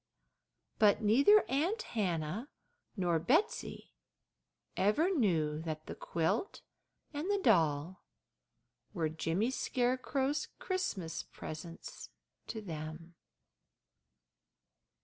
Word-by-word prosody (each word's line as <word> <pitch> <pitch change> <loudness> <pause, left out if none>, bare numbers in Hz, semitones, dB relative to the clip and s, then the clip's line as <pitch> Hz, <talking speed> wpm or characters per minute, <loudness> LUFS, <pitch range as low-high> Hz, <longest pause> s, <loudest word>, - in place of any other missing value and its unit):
But 210 +1 +5
neither 280 - +6
Aunt 350 - 0
Hannah 185 - -1 0.5
nor 175 -3 +2
Betsey 320 - 0 0.8
ever 215 - +3
knew 160 - +1
that 155 -1 -5
the - - -6
quilt 165 - -1 0.5
and 300 +6 -3
the 405 - +3
doll 165 - +2 0.9
were 160 -3 0
Jimmy 165 +9 0
Scarecrow's 265 +3 0
Christmas 295 - -2
presents 165 +2 -8 0.4
to 220 - -5
them. 160 -1 -7
200 Hz, 85 wpm, -33 LUFS, -, 0.9 s, neither